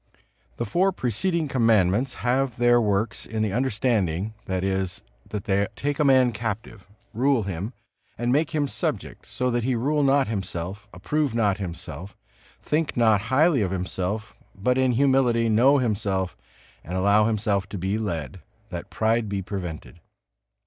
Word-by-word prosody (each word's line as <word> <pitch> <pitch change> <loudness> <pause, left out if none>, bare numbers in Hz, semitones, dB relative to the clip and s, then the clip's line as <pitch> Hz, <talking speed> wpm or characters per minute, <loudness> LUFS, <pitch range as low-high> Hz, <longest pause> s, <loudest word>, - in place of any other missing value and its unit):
The - - -2
four 185 - +2
preceding 160 - -1
Commandments 115 -1 +2
have 130 -1 +1
their 120 0 +4
works 105 +2 0
in 110 -1 -3
the 105 -3 -1
understanding, 110 -6 0
that 95 -1 -2
is, 95 -2 -2 0.3
they 100 -1 0
take 145 0 -2
a - - +4
man 130 -3 +5
captive, 110 -2 -5 0.3
rule 130 +1 +2
him 95 +4 -4 0.4
and 120 +1 0
make 150 +4 +2
him 150 -3 0
subject, - - -4
so 125 0 -1
that 120 -1 0
he 130 +1 +1
rule 145 +6 +1
not 140 -1 +3
himself, 95 -1 -4
approve 135 +8 -1
not 105 -3 +1
himself, 95 +1 -7 0.5
think 155 -2 -1
not 110 -4 +4
highly 145 0 +4
of 95 - 0
himself; 95 +3 -3 0.2
but 125 +6 +1
in 130 -1 +2
humility 125 -3 +3
know 125 +6 +5
himself 100 -6 -1 0.5
and 90 +3 -4
allow 100 +3 +4
himself 105 -3 0
to 100 - -5
be 95 +4 -1
led, 85 -4 -4 0.3
that 85 -1 -6
pride 110 0 0
be 100 -1 -2
prevented. 90 -3 -6
110 Hz, 150 wpm, -25 LUFS, 95-130 Hz, 0.5 s, man